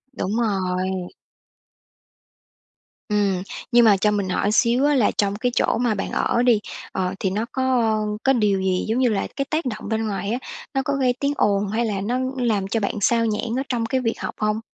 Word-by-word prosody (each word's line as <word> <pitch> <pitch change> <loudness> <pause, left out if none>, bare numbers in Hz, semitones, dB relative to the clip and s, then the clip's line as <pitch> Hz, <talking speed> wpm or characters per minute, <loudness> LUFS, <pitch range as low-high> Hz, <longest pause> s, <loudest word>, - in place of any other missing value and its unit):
Đúng 190 - -2
rồi. 185 -4 -1 2.0
Ừm, 200 -3 +1 0.3
nhưng 240 -1 +6
mà 205 -3 +6
cho 210 +2 +2
mình 200 -2 -1
hỏi 200 +3 +1
xíu 240 +4 +3
á 295 - +3
là 240 -6 +3
trong 200 -1 +1
cái 245 +4 -1
chỗ - - +2
mà 235 -2 +1
bạn 195 - -4
ở 235 - +1
đi, 240 -4 +4 0.3
ờ, 185 -1 -1
thì 190 - 0
nó 210 +4 -1
có 260 - -1 0.6
có 270 - +4
điều 210 -5 +2
gì, 185 -1 0
giống 230 +4 0
như 255 - +3
là, 205 -3 -1
cái 275 - -1
tác 315 0 -1
động 215 -4 -4
bên 220 0 -1
ngoài 200 0 -3
á, 245 - -1 0.3
nó 270 - +1
có 280 - 0
gây 260 -2 +2
tiếng 280 0 0
ồn 200 0 +2
hay 225 +4 0
là 200 -3 -2
nó 240 +6 -1 0.2
làm 215 -6 0
cho 225 +3 0
bạn 200 - -1
xao 230 +3 +3
nhãng 225 +2 -1
ở - - -1
trong 235 -3 0
cái 260 +3 0
việc 230 -2 -2
học - - -4
hông? 215 0 0
215 Hz, 215 wpm, -22 LUFS, 200-240 Hz, 2.0 s, nhưng